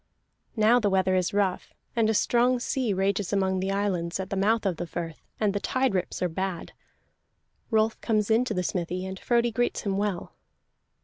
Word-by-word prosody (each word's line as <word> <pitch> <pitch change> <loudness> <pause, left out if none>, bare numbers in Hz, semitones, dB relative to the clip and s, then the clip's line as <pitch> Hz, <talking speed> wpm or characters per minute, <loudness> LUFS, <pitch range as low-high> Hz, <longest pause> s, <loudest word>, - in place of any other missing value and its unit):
Now 225 +2 +5
the 210 -3 +1
weather 190 -1 +2
is 185 -1 +1
rough, 200 -2 -1 0.2
and 225 -2 +3
a 220 - +1
strong 245 +3 +3
sea 245 -1 -1
rages 195 0 0
among 190 -2 +1
the 190 +1 -2
islands 190 -3 -1
at 190 0 -5
the - - 0
mouth 215 +3 +2
of 185 -4 0
the 175 - -4
firth, 165 -1 -6 0.2
and 210 -2 +1
the 205 - -1
tide 260 +2 0
rips 185 -1 -2
are - - +3
bad. 180 +1 -4 1.0
Rolf 220 -1 +1
comes 215 -1 +1
into 230 0 +2
the 180 - 0
smithy, 180 +1 -2
and 190 0 -6
Frodi 235 -1 +2
greets 240 +2 0
him 195 -2 -1
well. 200 -4 -2
200 Hz, 190 wpm, -27 LUFS, 185-220 Hz, 1.0 s, Now